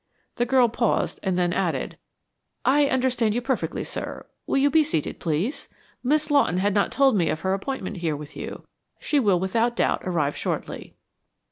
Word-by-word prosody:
The 240 - +1
girl 255 -1 +5
paused 235 0 0
and 190 -2 -1
then 175 -1 +1
added, - - -1 0.7
"I 285 +2 +4
understand 250 -4 +1
perfectly, 260 +1 -1
sir. - - -6 0.2
Will - - +1
you 280 +1 +3
be 315 +1 +5
seated, 285 - -2
please? 170 - -2 0.3
Miss 300 +3 +1
Lawton 280 -10 +3
had 200 +2 +1
not 205 0 +1
told 270 -3 +4
me 170 -5 +2
of 155 - -2
her 190 0 0
appointment 200 -1 -4
here 165 -3 -1
with 145 +1 -9
you. - - -7 0.4
She 295 - +1
will 200 -8 +3
without 225 +6 0
doubt - - +1
arrive 155 -6 0
shortly." - - -4
225 Hz, 170 wpm, -24 LUFS, 180-265 Hz, 0.7 s, girl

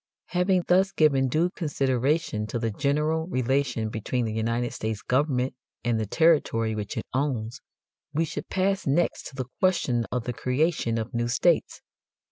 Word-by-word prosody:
Having 180 0 +2
thus 190 +2 +4
given 140 -5 +3
due 165 +7 +1
consideration 135 - 0
to 115 - -3
the 115 -1 -1
general 150 +7 0
relation 130 -5 0
between 115 +3 -2
the 110 - -3
United 115 +2 -1
States 110 -1 -4
government 130 -1 +1 0.3
and 120 -1 +1
the 110 - -2
territory 130 - +3
which 105 -1 -4
it - - -3
owns, 130 -2 -2 0.5
we 160 +3 +1
should 145 -1 -6
pass 195 0 0
next 160 +5 +1
to 140 - -12
the 130 -2 -3
question 135 -11 +2
of 125 -1 -1
the 125 - -3
creation 130 -1 0
of 115 +3 -4
new 120 0 0
states. 150 +7 +1
130 Hz, 160 wpm, -26 LUFS, 115-160 Hz, 0.5 s, thus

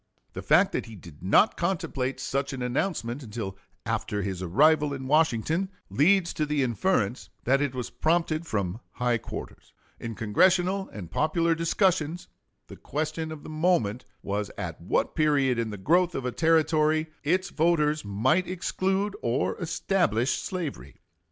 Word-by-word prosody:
The - - -5
fact - - +4
that - - -3
he 110 - -10
did 85 -5 -13
not 100 - +4
contemplate 135 -8 -2
such 140 +1 -2
an 130 -2 -4
announcement 125 -1 -2
until 105 -5 -5 0.3
after 105 -2 -2
his 95 -3 -4
arrival 145 - +3
in 135 -1 -7
Washington 155 - +2 0.2
leads 175 +4 +3
to 155 - -1
the 145 -2 +1
inference 125 - 0
that 135 +3 +3
it 140 -3 -1
was 125 -2 -4
prompted 165 0 0
from 100 - -2
high 120 -1 0
quarters. - - -9 0.3
In 115 -1 -5
Congressional 185 - +2
and 90 -6 -9
popular 165 +2 +1
discussions 165 0 0 0.4
the - - -12
question 155 +2 -3
of 155 -2 -8
the - - -9
moment 155 - +1 0.2
was 100 +1 -2
at - - -5
what - - 0
period 140 -5 +2
in 115 -1 -1
the 105 - -6
growth 170 - +2
of 135 - -3
a 125 - -1
Territory 155 0 +2 0.2
its 185 +6 +1
voters 155 -2 +2
might 130 - +1
exclude 190 +2 -1
or 120 +3 0
establish 165 - +1
slavery. 160 - -4
150 Hz, 150 wpm, -27 LUFS, 115-170 Hz, 0.4 s, fact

